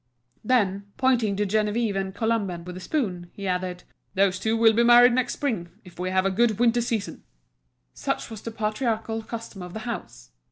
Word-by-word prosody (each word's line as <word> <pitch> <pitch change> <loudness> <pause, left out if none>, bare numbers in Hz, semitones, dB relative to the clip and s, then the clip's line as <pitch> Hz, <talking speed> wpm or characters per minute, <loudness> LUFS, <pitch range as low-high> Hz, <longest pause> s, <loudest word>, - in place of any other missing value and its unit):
Then, 205 -4 +1
pointing 245 -6 +2
to 205 +1 0
Geneviève 210 +1 0
and 190 0 -3
Colomban 205 -6 -1
with 180 0 -7
his 185 - -8
spoon, 185 - -2
he 200 -1 -6
added: 180 -1 -2 0.3
"Those 190 -1 +2
two 220 +3 0
will 225 0 +6
be 230 - +3
married 240 +1 +7
next 255 0 +1
spring, 220 -12 -2
if 180 -2 -15
we 180 +1 -1
have 185 0 +1
a 195 - +2
good 220 +1 +2
winter 240 0 +3
season." 230 -4 -3 0.7
Such - - -3
was 220 -2 -7
the - - -5
patriarchal 225 0 -2
custom 225 -3 -7
of 180 0 -8
the 220 - -4
house. - - -7
215 Hz, 190 wpm, -25 LUFS, 185-230 Hz, 0.7 s, married